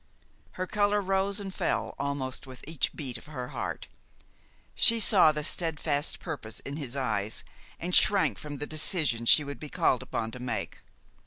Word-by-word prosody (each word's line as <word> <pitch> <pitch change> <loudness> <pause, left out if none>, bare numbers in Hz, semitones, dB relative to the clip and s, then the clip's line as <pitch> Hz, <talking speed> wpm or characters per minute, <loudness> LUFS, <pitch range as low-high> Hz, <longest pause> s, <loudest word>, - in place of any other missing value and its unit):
Her 185 - -3
color 205 +1 +1
rose 195 +1 0
and 195 -2 -6
fell - - -1
almost 140 -2 -3
with 130 -1 -10
each 160 -2 -1
beat 125 -5 -5
of - - -17
her 125 -5 -6
heart. - - -5 0.9
She 230 0 +6
saw 190 -7 +6
the 150 0 -4
steadfast 155 -2 0
purpose 140 -10 -6
in 140 +2 -6
his 140 -4 -5
eyes, 110 -5 -1 0.4
and 180 +2 -4
shrank 200 0 +4
from 145 -1 -7
the 145 - -4
decision 150 -7 +1
she 150 - +6
would 140 -3 -7
be 150 - -8
called 125 - +1
upon 110 -1 -4
to 125 - -8
make. 125 -1 -4
150 Hz, 170 wpm, -28 LUFS, 130-180 Hz, 0.9 s, She